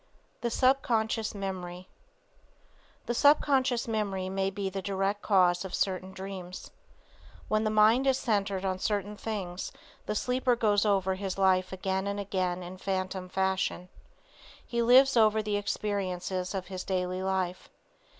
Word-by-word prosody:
THE 235 - 0
SUBCONSCIOUS 230 -4 +1
MEMORY 185 -2 -5 1.2
The 240 - -1
subconscious 270 -3 +3
memory 200 -4 -2
may 195 0 0
be 195 0 -4
the 195 0 -4
direct 195 +1 -1
cause 180 -3 +3
of 190 -1 -4
certain 185 -1 -1
dreams. 190 -1 -8 0.8
When 215 0 +1
the - - +2
mind 215 +5 +4
is 265 -1 +4
centered 200 -6 -1
on 185 -1 -1
certain 205 +1 -1
things, 195 -5 -4 0.4
the 210 - -1
sleeper 250 +2 +1
goes 210 -2 +2
over 190 -2 +2
his 190 0 -4
life 185 -1 +3
again 190 +1 -2
and 200 0 -2
again 185 -2 -2
in 180 +1 -8
phantom 185 -1 -3
fashion. 190 -1 -1 0.8
He 235 -2 -1
lives 260 +3 +6
over 220 -1 +4
the 210 -1 0
experiences 190 -2 -2
of 190 -1 -3
his 185 0 -6
daily 185 -1 -2
life. 190 -1 -2
195 Hz, 140 wpm, -29 LUFS, 185-215 Hz, 1.2 s, lives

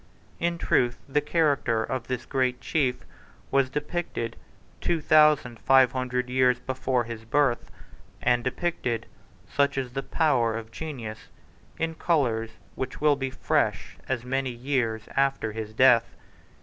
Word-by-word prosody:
In 170 0 0
truth, 120 -7 +1
the 150 +2 +1
character 145 -7 +1
of 120 +1 -4
this 130 -2 -3
great 130 -2 0
chief 130 -1 -1 0.5
was 135 -1 +3
depicted 150 -5 -3 0.4
two 170 - 0
thousand 150 -6 +4
five 130 -2 +5
hundred 125 -1 -2
years 125 -1 +3
before 130 -1 -1
his 115 -1 -7
birth, 125 +1 +1 0.5
and 120 0 +2
depicted, 125 -5 -2 0.4
such 140 -1 +1
is 130 -2 -2
the 135 - -2
power 125 -9 +1
of 115 0 -8
genius, 120 -9 -7 0.5
in 165 0 -1
colours 125 -10 0 0.2
which 130 -1 -5
will 150 -1 +4
be 135 -1 -3
fresh - - -1
as 125 -2 -2
many 135 +1 -1
years 120 -3 -1
after 135 -5 +1
his 110 0 -5
death. 115 -5 +4
130 Hz, 135 wpm, -26 LUFS, 120-145 Hz, 0.5 s, five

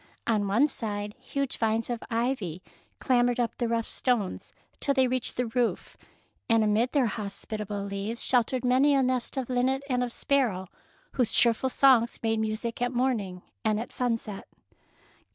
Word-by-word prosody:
On 210 -3 +1
one 230 +9 +4
side 210 -6 -4
huge 275 -2 -3
vines 225 0 +1
of 240 -2 -3
ivy 225 -8 -2 0.3
clam 245 -1 +2
bered 245 - 0
up 240 -2 -1
the 240 - 0
rough 230 -1 -1
stones 235 -7 -1 0.3
till 280 - +1
they 260 -1 +4
reached 255 -1 -2
the 250 - +1
roof, 235 +1 -1 0.5
and 225 -1 +4
amid 215 +4 +2
their 280 -4 +3
hospi 215 0 -5
table 205 -1 -4
leaves 200 +3 +1
sheltered 250 +1 +2
many 265 +3 +4
a 270 - +3
nest 255 +1 -1
of 260 -3 -2
linnet 260 +2 0
and 250 -2 0
of 245 - -3
sparrow, 230 -10 0 0.4
whose 240 -4 0
cheerful 235 +2 +3
songs 255 -3 +4
made 225 -1 +1
music 220 +2 -3
at 245 0 +1
morning 230 -8 -1 0.2
and 215 -1 +1
at 235 - -6
sunset. 230 -5 -2
235 Hz, 170 wpm, -27 LUFS, 215-255 Hz, 0.5 s, one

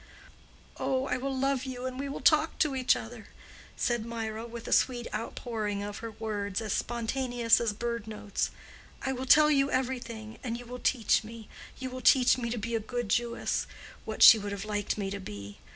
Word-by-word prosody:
"Oh, 265 0 0
I 250 - -1
will 265 +1 -3
love 270 -1 +1
you 255 -1 -5
and 255 0 -4
we 280 0 -3
will 275 - -5
talk 310 +1 +4
to 295 -3 +1
each 260 -1 +3
other," 225 -1 -8 0.5
said 240 -2 0
Mirah, 225 0 -4
with 235 0 -8
a - - -5
sweet 245 -2 +2
outpouring 215 -2 -3
of 205 0 -5
her 230 - -5
words, 210 -3 -3
as 220 -3 -2
spontaneous 240 0 +1
as 230 -2 +1
bird 235 +1 -4
notes. 210 -2 -2 0.5
"I 265 - 0
will 260 +1 -5
tell 305 +2 +7
you 275 -1 +3
everything, 240 -4 -3
and 235 -2 -2
you 245 - -10
will 250 +1 -7
teach 240 -4 +2
me:—you 230 +3 -10
will 255 0 -6
teach 255 -1 +6
me 240 -2 -3
to 240 - -2
be 230 +2 -4
a 225 - +2
good 240 0 -4
Jewess—what 235 +2 -2
she 225 - +11
would 205 0 -5
have 200 0 -5
liked 205 -1 -2
me 195 -2 -3
to 200 - -4
be. 100 - -9
235 Hz, 195 wpm, -29 LUFS, 215-255 Hz, 0.5 s, she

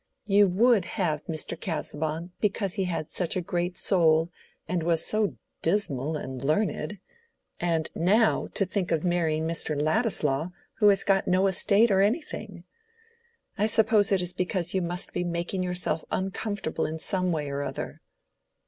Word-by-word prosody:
You 200 0 +5
would 210 +1 +3
have 155 -7 0
Mr. 155 -2 -3
Casaubon 160 0 -4
because 200 -2 0
he 195 - -1
had 165 -4 -3
such 175 -3 -1
a - - +1
great 175 +1 -2
soul, 165 -3 +3 0.4
and 175 0 -1
was 165 0 +1
so 215 - 0
old 210 -2 +2
and - - -26 0.2
dismal 160 -5 0
and 130 -3 -6
learned; 205 +6 0 0.6
and 165 -2 -1
now, 210 +7 +2
to 195 - +3
think 185 0 -2
of 160 -2 +1
marrying 160 -3 +1
Mr. 160 -3 0
Ladislaw, 155 - +2 0.3
who 210 - +5
has 200 -2 +5
got 195 -1 +2
no 185 +2 +3
estate 200 +3 +4
or 190 0 +4
anything. 235 +11 -2 1.0
I 210 - +3
suppose 220 -2 +3
it 190 -2 +2
is 180 0 -5
because 180 -1 -1
you 190 - +1
must 175 +1 -3
be - - -1
making 175 +2 -2
yourself 180 -3 -2
uncomfortable 195 -3 -2
in 160 +1 -4
some 185 +2 -1
way 150 -3 -2
or 140 0 -2
other." - - -5
180 Hz, 165 wpm, -27 LUFS, 160-200 Hz, 1.0 s, You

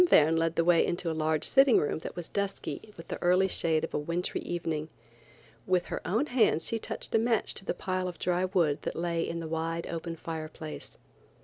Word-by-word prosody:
Verne 155 +2 +6
led 165 0 +1
the 165 - +3
way 175 -1 +5
into 175 -1 -1
a - - -1
large 155 -1 0
sitting 270 -2 +6
room 150 - 0
that - - -7
was 175 -2 -5
dusky 200 +1 -4
with 165 - -11
the - - -5
early 180 +2 +4
shade 165 -3 +1
of 160 - -4
a - - +1
wintry 170 +4 -2
evening. 160 -3 -3 0.8
With 180 -1 +2
her - - -2
own 225 +10 +2
hands 245 - +2
she 230 - -1
touched - - -5
a 225 - +5
match 230 -1 +1
to 195 - -4
the - - -1
pile 185 -1 -2
of 175 -2 -6
dry 180 +1 +1
wood 170 -6 +1
that - - -4
lay 170 0 -1
in 170 0 -2
the 165 - -5
wide 165 +1 -2
open 165 0 -4
fireplace. 155 -1 -7
170 Hz, 215 wpm, -29 LUFS, 160-185 Hz, 0.8 s, Verne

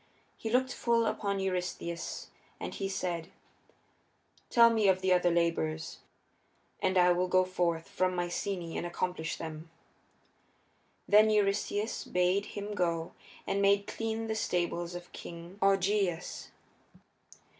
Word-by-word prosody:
He 225 - -5
looked 255 +2 +2
full 235 -1 +2
upon 200 -2 -1
Eurystheus 180 -2 -3 0.3
and - - -5
he 195 -1 -3
said, 175 -3 -3 1.2
"Tell 235 -1 +7
me 220 -3 +3
of 185 -1 +3
the 190 -1 +3
other 180 -1 +3
labors, 165 -2 0 0.8
and 190 0 +2
I 180 0 +6
will 180 +1 +1
go 185 0 +4
forth 170 -3 -1
from 185 0 0
Mycenæ 175 0 -3
and - - -3
accomplish 175 -2 -2
them." 160 0 -7 1.4
Then 215 +1 +6
Eurystheus 205 +1 0
bade 180 +3 +1
him 205 +1 -4
go 170 -4 -1 0.3
and 200 - 0
make 200 0 +4
clean 225 +1 -3
the 220 - -1
stables 175 -4 -1
of 175 0 -9
King 170 +3 -9
Augeias. 195 -2 +1
185 Hz, 125 wpm, -31 LUFS, 175-205 Hz, 1.4 s, Tell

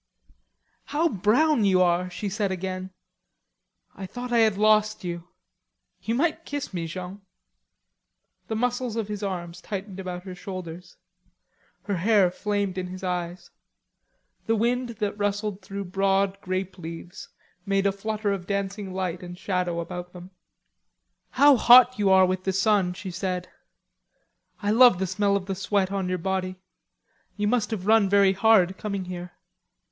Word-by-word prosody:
"How 315 +3 +1
brown 235 - +2
you 190 -2 +4
are!" 180 +1 +1
she 190 +3 -5
said 200 0 -1
again. 185 0 -4 1.0
"I 190 -1 -7
thought 245 +4 -7
I 235 - +4
had 220 -3 +3
lost 215 0 +3
you.... 175 -1 -5 0.7
You 230 - -2
might 320 +4 0
kiss 285 -8 -5
me, 170 -2 -3
Jean." 185 +4 -7 1.3
The 220 - -3
muscles 245 0 -1
of 220 -3 -3
his 210 -1 -4
arms 180 -3 -5
tightened 195 -1 -6
about 180 -1 -5
her 185 -1 -8
shoulders. 180 -2 -8 0.9
Her 200 -3 -2
hair 195 0 +3
flamed 200 -1 -2
in 180 - -4
his 185 +1 -9
eyes. 175 -1 -4 1.0
The 225 - +2
wind 240 +3 0
that 205 0 -3
rustled 205 0 -2
through 200 +1 -6
broad 195 0 +1
grape 185 0 -4
leaves 170 +3 -9 0.4
made 195 0 +1
a 200 - +4
flutter 210 +1 -2
of 185 -3 -4
dancing 200 0 -3
light 185 -1 -3
and 175 0 -9
shadow 180 -3 -2
about 180 +1 -6
them. 180 +1 -11 1.0
"How 285 -2 +5
hot 250 +1 +7
you 200 -2 +3
are 190 0 +6
with 185 0 -2
the 190 - -1
sun!" 195 -2 +2
she 185 +1 -7
said. 180 0 -3 1.1
"I 205 - +1
love 240 -3 +7
the 190 - -1
smell 200 +2 +1
of 195 -2 -2
the 195 - -3
sweat 195 0 0
of 195 -2 -2
your 185 - 0
body. 185 +1 -2 0.8
You 205 0 0
must 235 0 +1
have 210 -5 -4
run 215 -2 +4
very 200 -1 +5
hard, 195 -3 +3
coming 200 -3 -3
here." 180 -1 -7
195 Hz, 155 wpm, -25 LUFS, 180-210 Hz, 1.3 s, hot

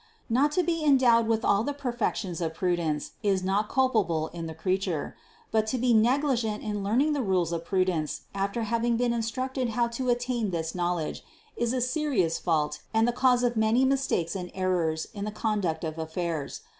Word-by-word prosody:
Not 275 +5 +3
to 360 - +2
be 330 -1 -1
endowed 250 -6 +5
with 225 -1 +1
all 200 +1 +3
the 285 +3 -3
perfections 240 - -2
of 160 -1 -2
prudence, 170 -5 -1
is 195 -2 +1
not 200 +3 0
culpable 210 -12 +1
in 165 -1 -6
the 160 - -7
creature; 185 -2 -2 0.4
but 220 -1 +2
to 255 - -1
be 245 0 +2
negligent 235 -1 +2
in 210 -2 -3
learning 255 +10 +2
the 285 - 0
rules 185 -6 +1
of 170 0 -3
prudence 185 -5 0
after 200 +4 -1
having 230 +1 +1
been 240 0 +1
instructed 255 +2 -2
how 235 -1 +3
to 250 +2 -3
attain 240 -2 0
this 165 -2 -3
knowledge, 175 -3 -2 0.3
is 235 -1 0
a 255 0 0
serious 250 - 0
fault 155 -4 0
and 225 +1 +4
the - - +3
cause 250 0 +3
of 240 -1 +1
many 220 +4 +3
mis 270 0 +1
takes 170 +2 -1
and 180 -2 -4
errors 175 -4 0
in 200 -2 -5
the 210 - -2
conduct 205 -7 -1
of 160 0 -4
affairs. 160 - -3
215 Hz, 190 wpm, -27 LUFS, 175-245 Hz, 0.4 s, endowed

